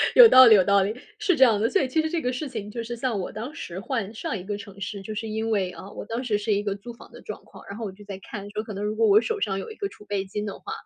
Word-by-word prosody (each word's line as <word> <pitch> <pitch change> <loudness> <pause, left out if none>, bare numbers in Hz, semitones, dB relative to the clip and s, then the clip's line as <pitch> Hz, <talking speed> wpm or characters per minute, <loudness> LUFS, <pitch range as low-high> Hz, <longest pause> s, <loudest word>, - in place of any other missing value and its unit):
有 - - +11
道 260 0 +10
理 220 -2 +9
有 190 - +5
道 200 0 +4
理， 200 +3 0 0.3
是 400 -4 +2
这 265 - +6
样 220 -5 +5
的。 225 +3 +2
所 390 - +2
以 - - +1
其 315 +5 +1
实 315 - -2
这 335 -1 -1
个 250 - 0
事 255 +4 -4
情， 215 -5 -6
就 235 - -4
是 240 +1 -5
像 235 -4 -1
我 180 - -4
当 235 +8 -6
时 185 - -7
换 225 -3 -3
上 220 0 -4
一 180 - -9
个 205 0 -3
城 200 -1 -11
市， 200 0 -5
就 215 +3 -6
是 220 +1 -4
因 220 +1 -2
为， 190 -4 0
啊， 185 +3 -11
我 - - -8
当 230 +3 -4
时 220 -5 +1
是 210 0 0
一 205 +1 0
个 200 - -1
租 205 +4 -9
房 - - -15
的 - - -12
状 - - -8
况， - - -15
然 200 - -7
后 230 - -5
我 200 - -4
就 205 +2 -15
在 195 -2 -7
看 205 -2 -7
说， 215 +1 -3
可 215 - -8
能 200 - -5
如 215 +1 -2
果 225 0 +3
我 205 +1 +7
手 435 - -3
上 195 -1 0
有 - - -6
一 440 - -9
个 400 -2 -3
储 210 - -16
备 200 -2 -2
金 210 +2 -5
的 200 - -4
话， 420 - -8
215 Hz, 375 characters per minute, -25 LUFS, 200-245 Hz, 0.3 s, 有